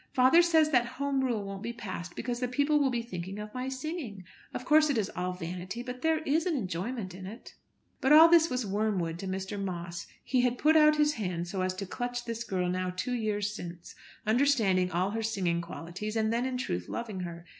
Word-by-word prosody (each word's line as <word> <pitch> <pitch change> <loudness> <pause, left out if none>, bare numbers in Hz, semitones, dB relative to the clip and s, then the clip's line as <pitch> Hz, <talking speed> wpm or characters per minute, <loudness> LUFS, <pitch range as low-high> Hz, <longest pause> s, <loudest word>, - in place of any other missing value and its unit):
Father 260 +7 +6
says 320 -3 +4
that 245 -2 +2
Home 280 -1 0
Rule 235 -5 0
won't 195 0 -6
be 235 - -4
passed 185 -7 -6
because 240 0 -3
the 250 - 0
people 285 +4 +2
will 280 -2 +3
be 240 -2 -1
thinking 190 -3 -6
of 210 0 -7
my 255 +1 -3
singing. 265 - -5 0.3
Of 250 - -6
course 305 +1 +5
it 280 - +1
is 210 -2 -1
all 180 0 -2
vanity, 180 +5 -5
but 250 0 -7
there 320 -1 +1
is 315 +4 +1
an 340 - +1
enjoyment 190 - -3
in 185 0 -8
it." 225 +5 -10 0.5
But 265 - +2
all 315 +2 +10
this 335 -1 +5
was 250 -2 -1
wormwood 195 -5 -1
to 195 - -5
Mr. 190 +2 -3
Moss. 170 -2 -5 0.2
He 255 -2 +2
had 250 0 +1
put 310 +4 +4
out 305 -1 +7
his 300 0 +3
hand 180 -7 -3
so 190 +1 -3
as 185 0 -1
to 195 +1 -4
clutch 245 +4 -4
this 230 0 -3
girl 185 -5 -1
now 185 +1 -1
two 185 +8 -3
years 210 -3 -1
since, 175 -4 -8 0.3
understanding 215 -6 +3
all 185 +3 0
her 225 +1 -2
singing 190 -6 0
qualities, 175 +5 -6
and 220 0 +1
then 240 +2 0
in 255 -1 -2
truth 90 - -3
loving 220 -5 -4
her. 170 -1 -6
220 Hz, 220 wpm, -30 LUFS, 185-260 Hz, 0.5 s, all